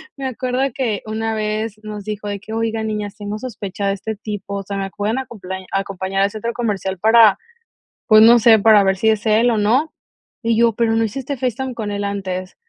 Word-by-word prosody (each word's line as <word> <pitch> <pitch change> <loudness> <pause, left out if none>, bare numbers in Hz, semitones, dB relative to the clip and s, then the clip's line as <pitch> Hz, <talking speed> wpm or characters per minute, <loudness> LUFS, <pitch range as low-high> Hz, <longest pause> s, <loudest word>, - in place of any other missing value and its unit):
me 275 - -6
acuerdo 255 0 -2
que 225 -6 -2
una 220 +1 -2
vez, 215 0 -3
nos 210 -1 -7
dijo 210 -1 -5
de 205 0 -4
que: 220 +2 -9
"Oigan, 225 -1 -1
niñas, 210 -1 -4
tengo 205 0 -5
sospecha 205 -5 -5
de 195 - +1
este 220 +3 -5
tipo. 200 -1 -6
O - - -6
sea, 200 +1 -5
me 195 0 -3
pueden 210 +4 -1
acomplañ 190 -7 -7
acompañar 195 0 -2
al 200 - +3
centro 225 +2 -4
comercial 200 -5 -2
para 220 -1 +6 0.7
pues, 215 -1 +7
no 235 +2 +8
sé, 225 -1 +6
para 210 -1 +6
ver 190 -1 +1
si 220 +3 +2
es 215 -1 0
él, 225 +3 +4
o 225 - 0
no". 245 +10 +1 0.5
Y 230 0 +2
yo: 230 -1 +4
"Pero, 230 -1 +1
¿no 225 - +2
hiciste 265 +5 -4
FaceTime, 255 +1 -2
con 220 -3 -4
él 205 0 -3
antes?". 185 -2 -4
215 Hz, 215 wpm, -19 LUFS, 200-230 Hz, 0.7 s, no